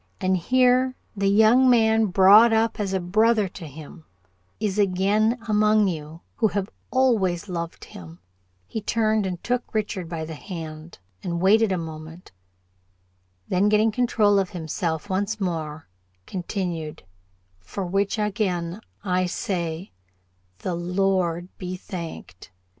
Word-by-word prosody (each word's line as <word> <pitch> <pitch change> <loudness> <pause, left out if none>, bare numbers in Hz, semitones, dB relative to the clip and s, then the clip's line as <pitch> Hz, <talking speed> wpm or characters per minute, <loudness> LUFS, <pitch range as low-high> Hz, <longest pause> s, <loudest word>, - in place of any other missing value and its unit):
And 185 0 +1
here, 255 +6 +3 0.2
the 200 -1 0
young 220 +5 +5
man 220 -2 +4
brought 200 +4 +7
up 225 +1 +1
as 200 -2 -1
a 190 - 0
brother 215 +4 +2
to 175 -2 -9
him, 155 +3 -11 0.6
is 210 -1 -1
again 205 +4 +2
among 215 -1 +3
you 160 -1 -5 0.2
who 225 - +3
have 200 -1 -3 0.2
always 210 -9 +1
loved 170 -2 -5
him," 85 -1 -11 0.5
he 220 - -5
turned 215 -1 +1
and 180 -2 -5
took 245 -1 -2
Richard 195 -5 -2
by 165 -2 -4
the 160 - -7
hand, 160 -1 -8 0.2
and 170 -1 -3
waited 210 +3 +4
a 185 - +1
moment; 160 +1 -8 1.2
then, 190 +3 +2
getting 215 +1 +3
control 215 -3 +2
of 190 -2 -1
himself, 160 0 -3
once 205 +3 -1
more 160 -5 -3 0.4
continued 175 -4 -4 0.6
"for 185 - -5
which 195 +4 0
again, 195 -3 -1 0.2
I 185 -2 +1
say, 175 -3 -3 0.7
the 180 - -3
Lord 180 -1 0
be 185 -1 -4
thanked. 170 - -8
190 Hz, 130 wpm, -24 LUFS, 170-215 Hz, 1.2 s, brought